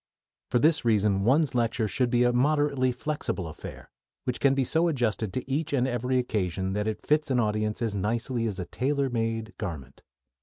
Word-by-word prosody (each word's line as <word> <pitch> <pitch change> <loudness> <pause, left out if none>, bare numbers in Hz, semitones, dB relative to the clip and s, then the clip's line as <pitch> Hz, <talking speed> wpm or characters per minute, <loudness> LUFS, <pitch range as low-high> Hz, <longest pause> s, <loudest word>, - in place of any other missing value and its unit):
For - - +2
this 150 +3 +3
reason 105 -3 +2
one's 140 +4 +3
lecture 115 -2 +1
should 120 +6 0
be 120 0 +3
a 120 0 +3
moderately 140 0 +2
flexible 135 - -3
affair, 80 - -10 0.3
which 125 -2 -2
can 135 -1 +3
be 135 - +2
so 165 +6 +2
adjusted 115 - 0
to 130 - -3
each 145 +3 -1
and 130 -2 +2
every 125 +1 0
occasion 95 -6 -1
that 105 +1 -1
it 110 -1 -4
fits 150 0 +2
an 130 -2 +2
audience 105 +1 0
as 110 -3 -1
nicely 115 +4 -1
as 100 -3 -4
a 90 - -4
tailor 135 +5 -1
made 115 -1 -2
garment. 75 - -6
120 Hz, 190 wpm, -27 LUFS, 105-135 Hz, 0.3 s, this